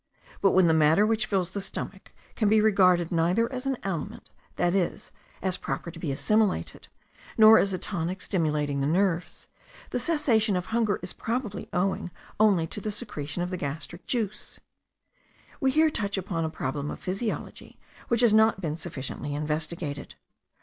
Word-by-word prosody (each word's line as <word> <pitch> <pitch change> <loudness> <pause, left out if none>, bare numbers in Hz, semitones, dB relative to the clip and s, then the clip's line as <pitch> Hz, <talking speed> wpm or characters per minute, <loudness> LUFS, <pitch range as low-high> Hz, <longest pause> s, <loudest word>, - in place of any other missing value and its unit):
But 195 - +4
when 185 -1 +5
the 165 - +4
matter 160 +5 +5
which 225 0 +1
fills 185 -3 0
the 200 - -4
stomach 195 0 -6 0.2
can 215 -3 +2
be 215 +1 +5
regarded 185 -5 +4
neither 180 +9 +1
as 255 +1 -4
an 270 -2 0
aliment, 180 -6 -5 0.2
that 175 0 +1
is, 190 -3 -1 0.3
as 185 -1 0
proper 170 - -4
to 165 - -11
be 155 -4 -2
assimilated, 215 +8 0 0.5
nor 220 0 +9
as 200 - +1
a 185 - -1
tonic 180 -1 -3
stimulating 150 -7 -1
the 140 - +1
nerves, 180 +1 0 0.4
the 250 - -1
cessation 240 - +2
of 180 0 -1
hunger 225 -2 0
is 180 - -4
probably 225 -4 -4
owing 185 0 -1 0.3
only 200 -6 +4
to 205 - -6
the 215 - -3
secretion 175 - -4
of 180 - -4
the 185 - -2
gastric 160 +3 -6
juice. 215 -4 -3 1.0
We 270 - +2
here 310 +3 +4
touch 200 -6 -1
upon 175 -4 -2
a - - -1
problem 145 -1 -3
of - - -6
physiology 195 +4 -4 0.3
which 235 0 +2
has 235 -3 +5
not 220 -2 +4
been 160 -4 -3
sufficiently 145 -3 -5
investigated. 150 0 -3
190 Hz, 170 wpm, -27 LUFS, 165-215 Hz, 1.0 s, nor